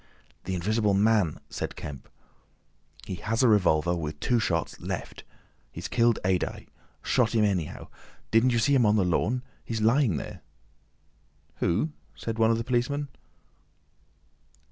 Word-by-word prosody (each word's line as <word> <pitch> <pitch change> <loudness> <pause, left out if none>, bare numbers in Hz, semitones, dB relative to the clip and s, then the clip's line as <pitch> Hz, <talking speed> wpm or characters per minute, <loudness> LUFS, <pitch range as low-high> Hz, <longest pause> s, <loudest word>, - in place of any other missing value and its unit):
"The 95 - -2
Invisible 105 +3 +1
Man!" 105 -5 +2
said - - -4
Kemp. 70 -3 -8 1.0
"He - - -5
has 115 +8 -1
a - - +6
revolver, 85 -5 +3
with 75 -3 -5
two 120 +7 +2
shots—left. 85 -7 -3 0.5
He's - - -6
killed 120 -2 +3
Adye. 95 -1 -1 0.4
Shot 120 -3 +1
him 110 -2 +4
anyhow. 90 -7 -2 0.4
Didn't 115 +3 +4
you 120 - +1
see 115 +5 +3
him 125 -5 +4
on 105 - +4
the 100 -4 +2
lawn? 120 +8 0 0.2
He's 115 -1 -3
lying 115 - +3
there." - - -7 1.2
"Who?" 95 - 0 0.2
said 115 0 -5
one 110 0 +5
of 115 - +3
the 115 - -2
policemen. 130 +4 -1
110 Hz, 140 wpm, -27 LUFS, 90-120 Hz, 1.2 s, a